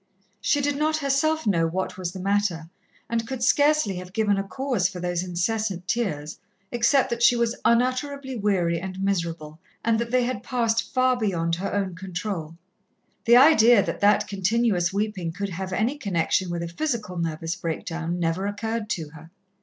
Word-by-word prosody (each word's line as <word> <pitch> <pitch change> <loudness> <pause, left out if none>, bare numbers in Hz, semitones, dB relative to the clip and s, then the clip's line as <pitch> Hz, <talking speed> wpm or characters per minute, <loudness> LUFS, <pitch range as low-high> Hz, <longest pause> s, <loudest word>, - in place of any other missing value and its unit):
She 290 - +1
did 285 0 0
not 310 +1 +1
herself 310 +2 +1
know 170 -6 +2
what 185 +3 -3
was 180 -2 -4
the 190 - -8
matter, 190 -4 -1 0.4
and 230 0 -2
could 260 -1 -4
scarcely 285 -7 +3
have 180 0 -8
given 210 -1 +2
a - - -1
cause 205 0 -1
for 180 - -8
those 175 0 -1
incessant 185 +1 -2
tears, 160 -11 -2 0.3
except 240 +3 +2
that 235 0 -2
she 240 - +6
was 235 0 0
unutterably 255 +3 +1
weary 185 -6 +1
and 190 +1 -6
miserable, 170 -5 -2 0.3
and 225 -1 +2
that 235 0 -2
they 250 +1 +2
had 240 -4 -2
passed 230 -2 0
far 255 0 +3
beyond 175 -8 -1
her 195 +3 -3
own 195 -2 -1
control. 175 -2 -5 0.7
The 235 +1 +7
idea 245 -6 +7
that - - -4
that 205 0 +3
continuous 195 -1 +1
weeping 200 -4 -2
could 200 +3 -3
have 190 +1 -5
any 235 +10 0
connection 185 - 0
with 170 0 -3
a - - -3
physical 210 - -3
nervous 165 0 -2
breakdown 165 +1 -4
never 170 +3 0
occurred 215 +1 -3
to 160 -6 -3
her. 160 +1 -14
200 Hz, 175 wpm, -25 LUFS, 175-235 Hz, 0.7 s, The